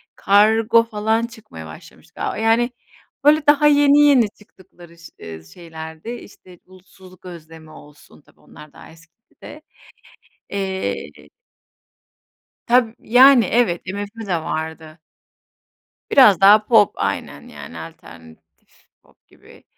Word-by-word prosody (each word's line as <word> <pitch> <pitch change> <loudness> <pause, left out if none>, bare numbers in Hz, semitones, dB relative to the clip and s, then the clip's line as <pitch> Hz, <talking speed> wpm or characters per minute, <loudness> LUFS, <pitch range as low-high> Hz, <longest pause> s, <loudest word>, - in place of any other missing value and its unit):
Kargo 220 +3 +2
falan 225 +1 -2
çıkmaya 215 - -13
başlamıştı 80 0 -16
galiba. - - -5
Yani, 225 +2 0 0.5
böyle 300 0 +3
daha 295 0 +4
yeni 290 0 +4
yeni 270 -7 +4
çıktıkları 175 -5 -20
ş 170 - -15
ııı, 80 -1 -11
şeylerdi. 160 - -11
İşte 185 -6 -12
Bulutsuzluk 185 0 -19
Özlemi 160 -2 -13
olsun; 150 0 -18
tabii - - -29
onlar 150 -1 -17
daha - - -16
eskide. 170 - -17 0.9
Eee 100 - -6 1.4
Tab 245 -1 +3
yani, 250 -1 +5
evet, 190 -6 0
MFÖ 205 +3 -7
de 180 -3 -2
vardı. 160 0 -7 1.1
Biraz 210 -9 +5
daha 210 +2 +6
pop 215 -4 +3
aynen 70 +1 -5
yani, - - -12
alternatif 80 -2 -16 0.2
pop - - -31
gibi. - - -21
195 Hz, 110 wpm, -19 LUFS, 160-230 Hz, 1.4 s, daha